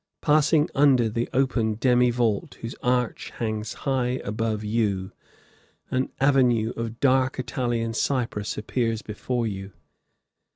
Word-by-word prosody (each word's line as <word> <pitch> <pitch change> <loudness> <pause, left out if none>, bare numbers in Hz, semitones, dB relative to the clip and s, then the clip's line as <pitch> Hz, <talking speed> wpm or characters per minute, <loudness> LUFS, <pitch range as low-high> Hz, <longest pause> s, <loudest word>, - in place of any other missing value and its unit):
Passing 155 0 +4
under 135 -5 +4
the 115 +2 -2
open 120 -4 +1
demi 125 +1 +3
vault, 115 -4 0
whose 115 +1 -5
arch 125 -1 0
hangs 110 -1 -3
high 130 -2 0
above 110 +1 -2
you, 105 -3 -1 0.8
an 130 +1 0
avenue 125 -5 +3
of 115 0 -5
dark 130 -1 +2
Italian 120 -2 -2
cypress 115 -4 -1
appears 115 +1 -1
before 120 +3 -3
you. 95 -2 -5
120 Hz, 120 wpm, -25 LUFS, 110-130 Hz, 0.8 s, Passing